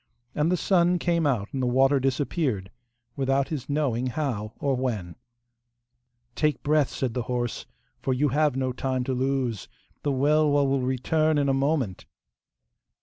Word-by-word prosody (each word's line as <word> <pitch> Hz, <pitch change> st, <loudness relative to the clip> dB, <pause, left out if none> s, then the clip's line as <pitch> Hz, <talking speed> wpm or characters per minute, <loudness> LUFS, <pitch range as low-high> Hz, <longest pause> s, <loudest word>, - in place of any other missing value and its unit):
And 150 Hz, +3 st, +1 dB
the 180 Hz, -, +2 dB
sun 175 Hz, -1 st, +3 dB
came 170 Hz, -2 st, +1 dB
out 110 Hz, -7 st, 0 dB
and 135 Hz, -, -2 dB
the 125 Hz, -, +1 dB
water 135 Hz, +3 st, +4 dB
disappeared, 130 Hz, -, -1 dB, 0.4 s
without 135 Hz, 0 st, +1 dB
his 150 Hz, -5 st, -5 dB
knowing 135 Hz, -4 st, 0 dB
how 120 Hz, -6 st, -3 dB
or 140 Hz, -2 st, +1 dB
when. 110 Hz, -9 st, -3 dB, 1.2 s
'Take 150 Hz, -3 st, 0 dB
breath,' 150 Hz, -1 st, +2 dB
said 130 Hz, -4 st, -3 dB
the 125 Hz, -, -1 dB
horse, 120 Hz, -2 st, -2 dB, 0.3 s
'for 135 Hz, -, -1 dB
you 140 Hz, +3 st, +2 dB
have 150 Hz, 0 st, +2 dB
no 130 Hz, -1 st, 0 dB
time 130 Hz, 0 st, -2 dB
to 130 Hz, -, -2 dB
lose. 130 Hz, -4 st, -1 dB, 0.3 s
The 145 Hz, -, 0 dB
Welwa 145 Hz, +1 st, +3 dB
will 135 Hz, 0 st, +1 dB
return 155 Hz, +5 st, +1 dB
in 140 Hz, -1 st, +2 dB
a -, -, +3 dB
moment. 135 Hz, -, -1 dB
135 Hz, 155 wpm, -26 LUFS, 125-150 Hz, 1.2 s, water